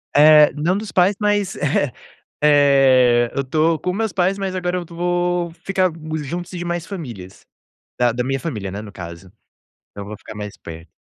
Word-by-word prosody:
Eh, 150 0 +7
não 165 +6 0
dos 215 0 -6
pais, 185 +2 +3
mas, 205 -2 0
é 145 -1 0 0.5
é 135 -5 +4
eu 140 - 0
estou 155 +4 +1
com 180 - -2
os 180 - -3
meus 220 -1 -1
pais, 190 +2 +1
mas 195 -1 -3
agora 180 0 -1
eu 175 - -5
vou 175 0 -1
ficar 190 -1 +1 0.3
juntos 175 +5 -5
de 175 -1 -5
mais 170 -1 -3
famílias, 120 - -8 0.6
da 120 -1 +3
da 125 +1 -2
minha 135 0 -2
família, 105 - -4
né, 105 - -5
no 105 - -10
caso, 85 0 -10 0.6
então 100 - -8
eu - - -10
vou 105 0 -7
ficar - - -11
mais 105 -1 -7
perto. 80 0 -11
155 Hz, 190 wpm, -20 LUFS, 120-180 Hz, 0.6 s, Eh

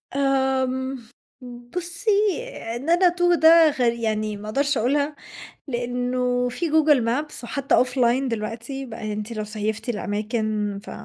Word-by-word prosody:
آمم، 265 -1 0 0.4
بُصي، 335 - -5 0.7
إن 270 +7 -5
أنا 350 +2 +5
أتوه، 350 0 +3
ده 325 0 +7
غري 235 -4 0
يعني 215 -1 -1
ما 210 +1 -9
أقدرش 280 +2 +1
أقولها 285 +6 0 0.5
لأنه 245 0 -1
فيه 310 +6 -3
Google 305 -3 +4
maps 255 +3 -2
وحتى 275 +3 -1
offline 255 0 +1
دلوقتي 230 +4 -4
بقى 220 -3 -6
أنتِ 210 +2 -5
لو 215 -2 -3
سِيّفتِ 215 +2 -4
الأماكن 210 -1 -2
ف - - -9
250 Hz, 130 wpm, -23 LUFS, 225-280 Hz, 0.7 s, ده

